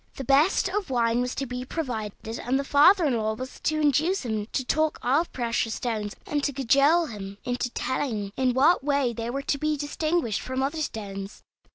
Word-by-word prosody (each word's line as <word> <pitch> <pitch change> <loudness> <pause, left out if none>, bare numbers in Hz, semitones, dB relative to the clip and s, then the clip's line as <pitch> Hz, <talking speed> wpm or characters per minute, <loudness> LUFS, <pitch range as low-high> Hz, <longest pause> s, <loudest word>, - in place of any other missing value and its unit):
The 270 - -5
best 280 +8 +3
of 390 -2 -2
wine 235 -1 +2
was 250 0 -2
to 275 - -2
be 250 0 -5
provided, 230 -6 -5
and 255 +2 0
the 275 - -1
father 325 +6 +5
in 270 -5 +2
law 220 -1 -1
was 255 +3 -8
to 310 0 0
induce 305 +4 +2
him 215 -2 -2
to 260 - -3
talk 310 +3 +1
of 285 +8 +2
precious 230 -2 -1
stones, 215 -4 -3
and 290 -1 -1
to 285 - +1
cajole 280 +6 +3
him 200 -6 -8
into 245 0 -1
telling 220 -6 -2
in 255 -2 +1
what 295 +4 +4
way 280 -4 +1
they 230 +1 -4
were 275 +3 -3
to 280 - -1
be 305 0 0
distinguished 295 - -1
from 260 +1 -2
other 310 +4 -2
stones. 200 -6 -6
260 Hz, 200 wpm, -26 LUFS, 230-295 Hz, -, father